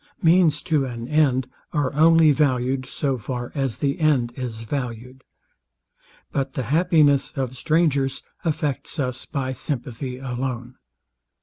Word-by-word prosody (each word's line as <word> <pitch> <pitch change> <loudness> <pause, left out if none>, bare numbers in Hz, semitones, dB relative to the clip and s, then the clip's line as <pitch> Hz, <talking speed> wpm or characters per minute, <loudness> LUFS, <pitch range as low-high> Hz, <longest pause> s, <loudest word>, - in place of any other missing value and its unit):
Means 165 -3 +4
to 150 -4 +1
an 120 -2 -6
end 135 -4 +2 0.3
are 145 -3 0
only 160 +1 +6
valued 130 -2 +1
so 135 -1 -2
far 120 +2 -5
as 135 -5 -1
the 140 -1 -1
end 135 -7 +2
is 115 -3 -5
valued. 125 +1 -5 1.1
But 135 -1 -2
the 130 - -2
happiness 145 - +3
of 130 -3 -3
strangers 145 -2 +1 0.2
affects 150 -3 -2
us 130 -4 -3
by 130 -2 -2
sympathy 125 -2 -4
alone. 125 -1 -4
135 Hz, 125 wpm, -23 LUFS, 125-150 Hz, 1.1 s, only